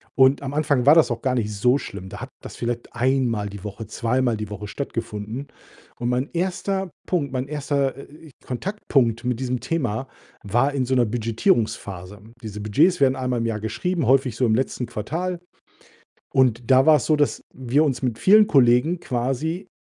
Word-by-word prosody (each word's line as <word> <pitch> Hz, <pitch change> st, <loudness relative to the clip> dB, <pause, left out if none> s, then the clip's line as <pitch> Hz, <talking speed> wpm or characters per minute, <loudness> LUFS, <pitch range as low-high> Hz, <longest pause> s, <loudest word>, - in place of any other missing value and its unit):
Und 135 Hz, +1 st, +5 dB
am 135 Hz, +1 st, -4 dB
Anfang 145 Hz, -4 st, +1 dB
war 150 Hz, +3 st, +8 dB
das 155 Hz, -6 st, +5 dB
auch 120 Hz, -, -3 dB
gar 130 Hz, -1 st, 0 dB
nicht 105 Hz, -3 st, -1 dB
so 125 Hz, +7 st, +3 dB
schlimm. 95 Hz, -8 st, -8 dB
Da -, -, -9 dB
hat -, -, -6 dB
das -, -, -9 dB
vielleicht 120 Hz, 0 st, -4 dB
einmal 120 Hz, -4 st, +1 dB
die 100 Hz, 0 st, -10 dB
Woche, 105 Hz, +1 st, -7 dB
zweimal 120 Hz, +1 st, 0 dB
die 105 Hz, -1 st, -5 dB
Woche 105 Hz, 0 st, -6 dB
stattgefunden. 115 Hz, +1 st, -5 dB, 0.5 s
Und 120 Hz, -, -2 dB
mein 125 Hz, +3 st, 0 dB
1. 190 Hz, +1 st, -2 dB, 0.2 s
Punkt, 145 Hz, -7 st, -1 dB
mein 130 Hz, +1 st, -2 dB
1., 140 Hz, -2 st, -1 dB
äh, 150 Hz, +2 st, -13 dB
Kontaktpunkt 125 Hz, -, 0 dB
mit 125 Hz, -1 st, -1 dB
diesem 125 Hz, -1 st, -1 dB
Thema 130 Hz, -5 st, -2 dB, 0.4 s
war 120 Hz, +8 st, +1 dB
in 130 Hz, -2 st, 0 dB
so 130 Hz, +1 st, 0 dB
'ner 120 Hz, -2 st, +4 dB
Budgetierungsphase. 110 Hz, -, -1 dB, 0.2 s
Diese 105 Hz, -2 st, -7 dB
Budgets 145 Hz, -, +2 dB
werden 130 Hz, 0 st, +4 dB
einmal 125 Hz, -2 st, -1 dB
im 115 Hz, -, -1 dB
Jahr 110 Hz, -2 st, -2 dB
geschrieben, 145 Hz, -, -2 dB
häufig 130 Hz, -3 st, +3 dB
so 125 Hz, -, +2 dB
im 110 Hz, -1 st, +3 dB
letzten 130 Hz, -1 st, -1 dB
Quartal 170 Hz, -, -4 dB, 0.9 s
und 125 Hz, -3 st, +2 dB
da 130 Hz, +1 st, +6 dB
war's 155 Hz, -1 st, +5 dB
so, 155 Hz, -, +3 dB
dass 145 Hz, -1 st, +1 dB
wir 130 Hz, +4 st, +1 dB
uns 135 Hz, -3 st, -1 dB
mit 120 Hz, -3 st, -1 dB
vielen 210 Hz, +2 st, +6 dB
Kollegen 130 Hz, +6 st, +4 dB
quasi 135 Hz, +9 st, -2 dB
130 Hz, 180 wpm, -23 LUFS, 115-145 Hz, 0.9 s, war